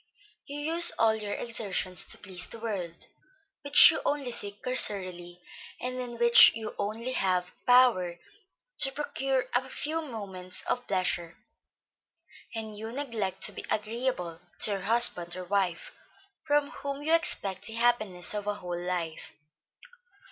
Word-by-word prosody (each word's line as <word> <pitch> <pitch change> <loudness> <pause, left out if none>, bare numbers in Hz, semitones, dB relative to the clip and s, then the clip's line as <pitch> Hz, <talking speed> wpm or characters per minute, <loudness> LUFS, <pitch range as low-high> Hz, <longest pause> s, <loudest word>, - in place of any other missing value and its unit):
You 285 +1 -6
use 330 +3 +6
all 225 -1 +3
your 210 -2 -5
exertions 195 -6 -2
to - - -6
please 185 -3 -7
the - - -9
world 195 -7 -6 0.6
which 285 -1 +8
you - - -4
only 280 -4 -2
see 205 -3 -3
cursorily, 185 -7 -2 0.4
and 255 0 -4
in 240 -1 -6
which 235 0 +7
you 220 -1 -5
have - - -13
only 225 +5 -3 0.5
power 240 -9 +4 0.6
to 270 - +7
procure 270 -2 -2
a 260 +2 0
few 315 +4 -3
moments 195 - -6
of 245 0 -3
pleasure, 175 -3 -2 1.2
and 220 -1 -5
you 220 +2 -7
neglect 230 -8 -4
to - - +5
be - - -8
agreeable 210 -6 -3 0.2
to 215 - +4
your 195 -1 -2
husband 190 -5 +2
or 185 - -6
wife, 180 -2 -2 0.5
from 290 -1 +1
whom 280 0 -6
you 320 +2 +1
expect 200 - +2
the 225 - -6
happiness 220 -7 +1
of 205 -1 -5
a 205 - -1
whole 175 -3 -6
life. 175 -3 -4
220 Hz, 145 wpm, -28 LUFS, 185-255 Hz, 1.2 s, which